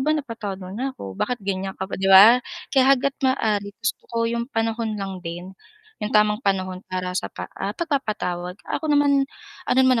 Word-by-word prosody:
ba 300 +4 +2
napatawad 230 -8 -5
mo 185 - -8
na 260 +5 -3
ko? 95 - -7
Bakit 240 - -2
ganyan 190 -1 -3
ka 190 - -3
pa?" 190 - -6
'di 195 - +1
ba? 205 +6 +9 0.3
Kaya 265 -2 +5
hangga't 275 +2 0
maaari 210 -6 0
gusto 225 0 -2
ko 230 - -7
yung 235 +1 -2
panahon 225 -2 -1
lang 195 -2 -5
din, 175 +2 -7 0.5
yung 210 - -2
tamang 210 +1 +3
panahon 185 -4 -1
para 185 0 -3
sa 185 - -2
pa - - -7
ah, 200 +2 -4
pagpapatawad. 210 - -2
Ako 315 - -3
naman, 285 -1 +3 0.4
ano - - +2
naman 255 -2 +4
210 Hz, 190 wpm, -23 LUFS, 190-250 Hz, 0.5 s, ba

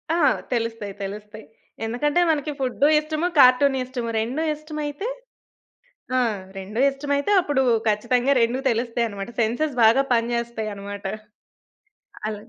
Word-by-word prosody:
ఆ! - - +1 0.4
తెలుస్తాయి, 230 -4 -3
తెలుస్తాయి. 210 +2 -8 0.4
ఎందుకంటే 290 +9 +1
మనకి 300 -1 0
ఫుడ్డు 265 +2 +1
ఇష్టము, 310 +2 -2
కార్టూను 265 +1 +6
ఇష్టము. 245 -2 -4
2 250 +8 -2
ఇష్టమైతే 305 +4 -5 1.1
ఆ! - - +4 0.4
2 195 +4 -6
ఇష్టమైతే 285 +3 -2
అప్పుడు 290 -6 0 0.3
ఖచ్చితంగా 245 +5 +2
2 235 +2 +1
తెలుస్తాయన్నమాట. 230 -3 -2
సెన్సెస్ 245 +6 0
బాగా 230 +5 +6
పని 235 0 +1
జేస్తాయన్నమాట. 215 -4 -5 1.2
అల 215 - -2
245 Hz, 110 wpm, -23 LUFS, 220-285 Hz, 1.2 s, కార్టూను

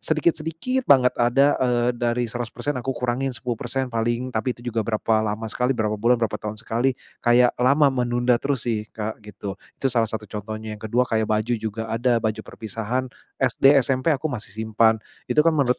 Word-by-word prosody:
sedikit-sedikit 165 - 0
banget 130 - +5
ada, 135 +4 +3
eee, 120 -2 +1
dari 120 0 0
100% 120 +4 -3
aku 130 +2 -2
kurangin 125 +2 -1
10% 125 +2 -3
paling. 120 +1 -1
Tapi 120 0 -2
itu 120 - -5
juga 115 -2 -1
berapa 110 0 +1
lama 110 +1 -3
sekali, 125 +4 0
berapa 110 -3 -1
bulan 120 +3 +2
berapa 115 -3 0
tahun 105 0 -6
sekali. 120 +3 0 0.3
Kayak 120 +1 +4
lama 140 +4 +4
menunda 120 -1 +1
terus 130 -2 -2
sih 110 -2 -1
Kak 110 0 -5
gitu. 100 -2 -7 0.2
Itu 135 - -1
salah 115 -2 +2
satu 110 -1 -4
contohnya. 110 +1 -6
Yang 110 +1 -7
kedua 125 +2 +3
kayak 110 -2 0
baju 110 +3 +1
juga 110 0 -4
ada 115 +2 +1
baju 110 -1 -2
perpisahan 115 +4 -4 0.3
SD, 130 +1 +4
SMP 130 +3 +1
aku 150 +1 0
masih 125 -10 -5
simpan. 110 +1 +2 0.3
Itu 150 +1 +4
kan 165 - +4
menurut 130 -4 +2
120 Hz, 185 wpm, -23 LUFS, 110-130 Hz, 0.3 s, banget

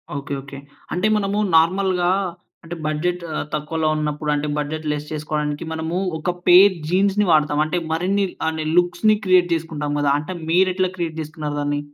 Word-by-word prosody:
Okay. 140 0 -5
Okay. 140 +1 -10 0.4
అంటే 180 +4 +1
మనము 200 0 -1 0.2
నార్మల్‌గా 180 +2 +3 0.5
అంటే 170 +1 -7
బడ్జెట్ 175 +4 -1 0.3
తక్కువలో 155 +1 -1
ఉన్నప్పుడు 150 0 -2
అంటే 145 +1 -2
బడ్జెట్ 155 +2 -3
లెస్ 150 0 -4
చేసుకోవడానికి 150 -1 -3
మనము 160 +2 -3 0.2
ఒక 160 +3 -3 0.2
పేర్ 190 +3 +8
జీన్స్‌ని 195 +3 +2
వాడతాం. 150 -1 +3
అంటే 175 +3 -2
మరిన్ని 190 +5 +1 0.2
అహ్, 160 0 -2 0.2
లుక్స్‌ని 175 +5 +3
క్రియేట్ 180 -2 +4
చేసుకుంటాం 155 -3 -4
కదా! 145 -1 +2
అంటే 160 +5 -6 0.2
మీరెట్లా 185 +1 +2
క్రియేట్ 165 -3 -4
చేసుకున్నారు 155 -1 -5
దాన్ని? 145 0 -1
160 Hz, 150 wpm, -21 LUFS, 150-180 Hz, 0.5 s, పేర్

